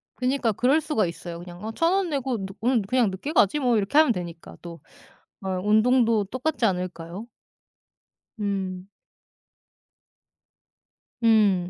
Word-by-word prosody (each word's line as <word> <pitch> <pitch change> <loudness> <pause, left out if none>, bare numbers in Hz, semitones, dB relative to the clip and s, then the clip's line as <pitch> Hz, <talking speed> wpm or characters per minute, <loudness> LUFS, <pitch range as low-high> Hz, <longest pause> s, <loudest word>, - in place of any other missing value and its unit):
그니까 255 -2 0
그럴 255 +9 +2
수가 300 - 0
있어요. 170 0 -7
그냥 175 +2 -11
어 220 - -3
'1,000 330 +9 +1
원 385 -2 +1
내고 270 -4 -1
늦 190 0 -9
오늘 240 0 +2
그냥 245 -1 +2
늦게 190 +11 -5
가지 285 - +3
뭐.' 245 -4 +2
이렇게 205 +7 0
하면 310 -4 +6
되니까 170 -4 -8
또 170 -1 -9 0.7
어 190 -1 -2
운동도 225 +2 +3
똑같지 260 +5 -2
않을까요? 180 +1 -4 1.1
음. 190 -2 -3 2.4
음 205 -6 +3
215 Hz, 245 characters per minute, -25 LUFS, 185-255 Hz, 2.4 s, 하면